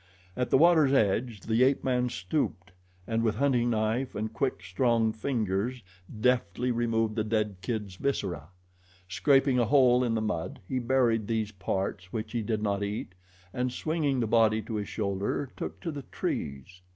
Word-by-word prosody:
At 125 -1 -1
the - - +5
water's 160 -3 +5
edge 110 -2 +1
the 115 +3 0
ape 135 +1 +3
man 125 -1 +1
stooped 95 - -2 0.3
and 115 0 0
with 110 -2 +1
hunting 125 -2 +2
knife 115 +3 0
and 110 +1 -3
quick 120 -7 -1
strong 110 +3 +1
fingers 110 0 -2 0.4
deftly 125 -1 +1
removed 115 -2 0
the 110 - 0
dead 105 -2 -1
kid's 105 -5 -4
viscera. 95 - -2 0.6
Scraping 135 - +3
a 120 - +3
hole 125 0 +5
in 115 -2 0
the - - +1
mud, 90 -7 -3
he 130 - -1
buried 120 -4 +2
these 110 -2 -1
parts 95 -1 -3
which 110 -1 -4
he 120 - -1
did 110 0 -2
not 100 -1 0
eat, 100 -2 -4 0.4
and 125 0 -1
swinging 150 -1 -1
the 115 - +1
body 110 -1 +3
to 110 - -7
his 105 -1 -3
shoulder 105 +6 -2
took - - -6
to 165 - -3
the 145 -2 -6
trees. 75 - -5
115 Hz, 170 wpm, -28 LUFS, 105-125 Hz, 0.6 s, the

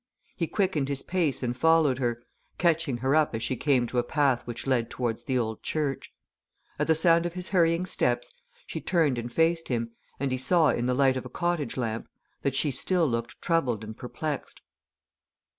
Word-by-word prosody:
He 170 -4 -1
quickened 175 -9 0
his 140 -1 -3
pace 170 -8 0
and 120 0 -1
followed 155 -2 +3
her, 120 -2 -1 0.3
catching 165 -6 +1
her 135 - +3
up 155 -6 +2
as 115 - -3
she 130 - -1
came 130 -1 +2
to 125 +1 -1
a - - +1
path 135 -3 +1
which 120 -1 -6
led 125 -4 +1
towards 120 -1 -3
the 130 0 0
old 110 -2 -2
church. 145 -4 -2 0.7
At - - +1
the 160 - +4
sound 165 +1 +4
of 170 - -7
his 180 0 -6
hurrying 170 -1 +3
steps 120 -8 -1 0.3
she - - -5
turned 155 -9 +2
and 120 +1 -6
faced 165 +4 +1
him, 115 -2 -2 0.3
and 140 -1 -1
he 130 - -1
saw 160 +4 +4
in 120 +1 0
the 125 - +1
light 135 -1 +3
of 130 - -5
a - - -13
cottage 175 0 -2
lamp 115 -2 -2 0.3
that 140 -2 -1
she 145 +2 +2
still 175 +6 +2
looked 115 -2 -3
troubled 130 -10 +1
and 110 0 -7
perplexed. 145 +4 -5
135 Hz, 195 wpm, -27 LUFS, 120-165 Hz, 0.7 s, the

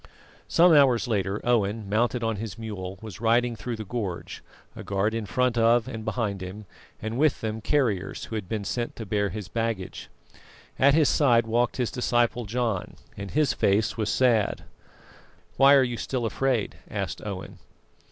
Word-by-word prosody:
Some 175 0 +5
hours 135 -5 +5
later, 100 -2 -1
Owen, 110 -3 +1
mounted 120 +4 0
on 115 -2 -1
his 110 +1 -6
mule, 100 -4 -6
was 105 -3 -9
riding 120 +1 +2
through 120 +1 -5
the 110 -1 -7
gorge, 100 -5 -5 0.3
a - - -8
guard 100 +2 0
in 115 -2 -3
front 125 +1 +1
of 115 +1 +4
and 115 -4 -6
behind 110 -4 -2
him, 95 +3 -7 0.3
and 110 +3 -4
with 155 -1 +2
them 110 0 -3
carriers 115 -7 0
who - - -10
had 105 -4 -4
been 110 -2 -2
sent 120 +4 -3
to 110 - -7
bear 100 0 0
his 105 -3 -6
baggage. 115 -3 -3 0.7
At 140 +1 +5
his 155 -3 +4
side 120 -6 +4
walked 120 +2 0
his 125 -3 -1
disciple 120 -1 +1
John, 115 -3 -2 0.2
and 100 0 -6
his 150 +4 +2
face 110 +3 +1
was 110 -1 -1
sad. 120 -5 +2 0.9
"Why 140 +1 +7
are 135 - +6
you 120 -2 -2
still 125 0 -2
afraid?" 120 0 -1
asked - - -4
Owen. - - -7
115 Hz, 170 wpm, -26 LUFS, 105-125 Hz, 0.9 s, Why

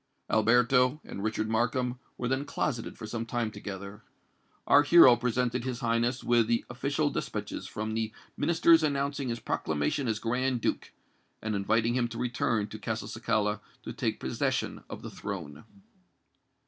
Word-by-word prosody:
Alberto 125 +5 +4
and 100 - -7
Richard 110 0 -1
Markham 125 +2 0 0.2
were 125 - -2
then 135 +2 0
closeted 130 -4 -3
for - - -7
some 115 +1 -3
time 115 -1 -2
together. 100 0 -7 0.6
Our 145 - +7
hero 145 -4 +8
presented 125 0 0
his 130 0 -4
Highness 120 +2 0
with 120 -2 +3
the 115 0 +1
official 140 +4 0
despatches - - -4
from 110 +1 -4
the 110 -1 -1 0.2
Ministers 165 -1 +4
announcing 140 -2 -1
his 115 0 -2
proclamation 80 - -1
as 110 -2 0
Grand 125 +3 0
Duke, - - -2 0.5
and 110 0 -3
inviting 110 +4 +1
him 120 -1 +1
to 115 0 -8
return 120 -3 0
to 110 - -8
Castelcicala 110 -1 -1 0.2
to - - -6
take - - -2
possession 65 - -2
of - - -8
the - - -7
throne. 70 +8 -6
120 Hz, 150 wpm, -29 LUFS, 110-130 Hz, 0.6 s, hero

